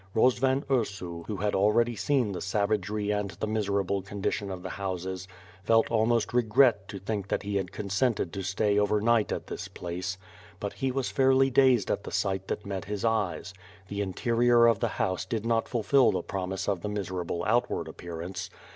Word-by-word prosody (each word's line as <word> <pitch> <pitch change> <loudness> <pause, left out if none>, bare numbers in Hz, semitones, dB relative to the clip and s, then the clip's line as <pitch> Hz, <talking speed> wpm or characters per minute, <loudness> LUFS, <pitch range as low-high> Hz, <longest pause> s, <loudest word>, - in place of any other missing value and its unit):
Rozvan 130 +4 +3
Ursu 100 -10 -2
who 105 - -3
had 105 +2 -1
already 115 +4 +3
seen 130 -4 +1
the 90 - -5
savagery 105 +1 0
and 105 -1 -1
the - - 0
miserable 100 -2 0
condition 100 +1 -3
of 90 -2 -6
the - - -5
houses 95 -1 -4 0.4
felt 115 +1 +3
almost 115 0 +2
regret 115 -3 +4
to 100 - -7
think 100 +1 -3
that - - -1
he 100 0 -1
had 95 -3 -3
consented 100 -1 -1
to 100 - -3
stay 100 +2 +1
over 105 +1 +2
night 115 0 +2
at - - -3
this - - -6
place. 90 +2 -5 0.4
But 100 - -4
he 135 -1 -1
was 135 0 -2
fairly 135 0 +4
dazed 130 -5 +4
at - - -1
the - - -7
sight 95 -1 -1
that 105 - -3
met 95 -2 -4
his 105 +1 -3
eyes. 100 -6 -1 0.4
The 100 0 -2
interior 115 +4 +3
of 115 -3 +4
the - - +1
house 95 0 0
did 110 +3 -3
not 115 -1 +1
fulfil 120 +2 +3
the - - -1
promise 95 0 -3
of 95 -4 0
the 105 - -3
miserable 90 -4 -3
outward 115 -7 +1
appearance. 85 +3 -6
105 Hz, 185 wpm, -28 LUFS, 95-115 Hz, 0.4 s, regret